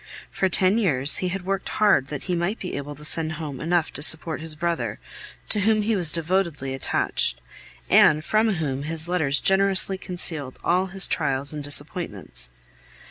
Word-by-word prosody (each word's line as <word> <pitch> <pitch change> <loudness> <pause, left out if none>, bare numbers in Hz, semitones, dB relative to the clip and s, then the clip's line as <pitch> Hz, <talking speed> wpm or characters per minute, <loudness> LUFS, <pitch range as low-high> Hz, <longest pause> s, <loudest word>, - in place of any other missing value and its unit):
For 190 - 0
ten 185 +4 +3
years 145 - +1
he 185 - -2
had 180 0 -5
worked 195 0 -3
hard 205 -11 +2
that 145 -1 -6
he 180 - -3
might 175 +6 -2
be 180 - -6
able 145 +1 -6
to 150 +1 -8
send 160 0 +2
home 150 -4 -7
enough 170 0 -1
to - - -4
support 160 +1 +2
his 160 -1 -5
brother, 170 +2 -3 0.5
to 210 - +5
whom 215 +1 +2
he 220 +1 0
was 175 -6 +3
devotedly 165 -5 -1
attached, - - +1 0.5
and 155 +1 +4
from 215 0 +1
whom 140 -5 -3
his 160 +2 -3
letters 155 -6 +1
generously 195 0 +2
concealed 165 -8 -2
all 180 +2 +1
his 190 0 +1
trials 140 +2 +1
and 150 -1 -6
disappointments. 145 - -1
165 Hz, 175 wpm, -23 LUFS, 145-190 Hz, 0.5 s, to